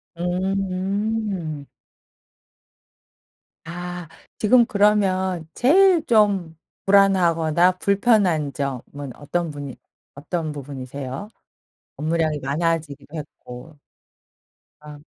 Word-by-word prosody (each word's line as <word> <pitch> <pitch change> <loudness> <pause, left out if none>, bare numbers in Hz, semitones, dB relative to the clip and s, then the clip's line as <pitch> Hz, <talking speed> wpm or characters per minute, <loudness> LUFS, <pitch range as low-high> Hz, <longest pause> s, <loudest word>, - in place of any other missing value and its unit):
음. 190 -2 -2 2.0
아 175 0 -6 0.3
지금 235 +2 +5
그러면 190 -5 +1
제일 340 +4 +4
좀 200 -8 +2 0.3
불안하거나 180 -3 +4
불편한 195 - +2
점은 140 0 -5
어떤 165 +3 -3
분이 145 -3 -7 0.4
어떤 155 +2 -3
부분이세요? 140 - -7 0.7
업무량이 155 -1 0
많아지기도 150 0 -2
했고 150 0 -10 1.0
아. 150 -1 -11
170 Hz, 170 characters per minute, -22 LUFS, 145-195 Hz, 2.0 s, 지금